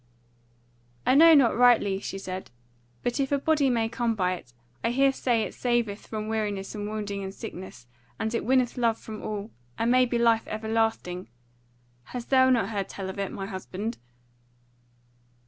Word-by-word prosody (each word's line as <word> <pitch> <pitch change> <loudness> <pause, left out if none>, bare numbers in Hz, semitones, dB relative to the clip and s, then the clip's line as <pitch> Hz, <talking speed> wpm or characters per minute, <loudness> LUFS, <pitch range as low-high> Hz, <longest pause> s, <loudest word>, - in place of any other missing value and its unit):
"I - - +4
know 325 +3 +8
not 265 -6 +5
rightly," 230 -5 +4
she 195 - -5
said, 185 -1 -6 0.5
"but 245 +3 -1
if 270 0 0
a 285 - +3
body 290 -1 +2
might 230 -2 0
come 235 -2 0
by 185 -3 +1
it, 125 -9 -9 0.3
I 230 - +2
hear 270 +3 +3
say 240 -4 +1
it - - -5
saveth 240 -4 -1
from 215 -1 -4
weariness 210 -3 -2
and 210 -1 -4
wounding 205 -2 -4
and 190 - -5
sickness; 185 - -9 0.3
and 220 +1 -2
it 230 - -1
winneth 255 +1 +2
love 230 -2 +2
from 215 -1 -8
all, 210 0 -5 0.3
and 230 +1 +1
maybe 250 -1 +3
life 230 -1 +3
everlasting. 220 -4 -1 0.8
Hast 245 0 -7
thou 260 -1 +6
not 230 -6 +2
heard 200 -3 -3
tell 190 -1 -5
of 195 - -9
it, 195 - -2
my 195 - -5
husband?" 200 +3 -5
225 Hz, 170 wpm, -27 LUFS, 200-245 Hz, 0.8 s, know